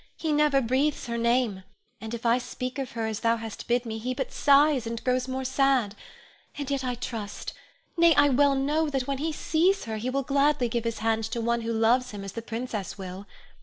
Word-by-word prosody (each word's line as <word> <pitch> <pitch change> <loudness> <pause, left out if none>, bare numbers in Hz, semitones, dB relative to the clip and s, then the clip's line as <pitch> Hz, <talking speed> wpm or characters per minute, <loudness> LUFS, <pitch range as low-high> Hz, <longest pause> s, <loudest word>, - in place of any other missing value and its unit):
He 315 -2 -1
never 295 -2 +3
breathes 265 +5 0
her 235 -1 -3
name, 235 -4 +1 0.4
and 220 +1 -5
if 235 - -9
I 235 +2 +4
speak 255 +1 -5
of 265 -2 -4
her 225 -1 -2
as 220 -2 -3
thou 230 0 +2
hast 225 -2 -7
bid 245 +1 +1
me, 220 -1 -4
he 250 +3 -3
but 265 -1 -3
sighs, 285 -3 +4
and 230 0 -5
grows 255 0 0
more 260 0 -3
sad; 260 -5 +2 0.6
and 285 -1 -4
yet 275 -1 -1
I 250 -1 -1
trust, 220 -4 -6 0.4
nay, 335 -2 +5
I 285 0 +5
well 280 +1 +4
know 295 +3 +1
that 270 -3 -1
when 275 0 -2
he 320 +2 -1
sees 345 +6 +1
her 220 -1 -4
he 235 +4 -3
will 275 +1 -1
gladly 280 -2 +2
give 235 0 -2
his 230 -1 -2
hand 225 -1 +1
to 235 - -3
one 235 +1 0
who 230 0 -3
loves 235 +3 +2
him 205 -3 -7
as 195 - -6
the 230 - -6
princess 225 -4 -5
will. 190 +1 -8
250 Hz, 225 wpm, -27 LUFS, 225-275 Hz, 0.6 s, nay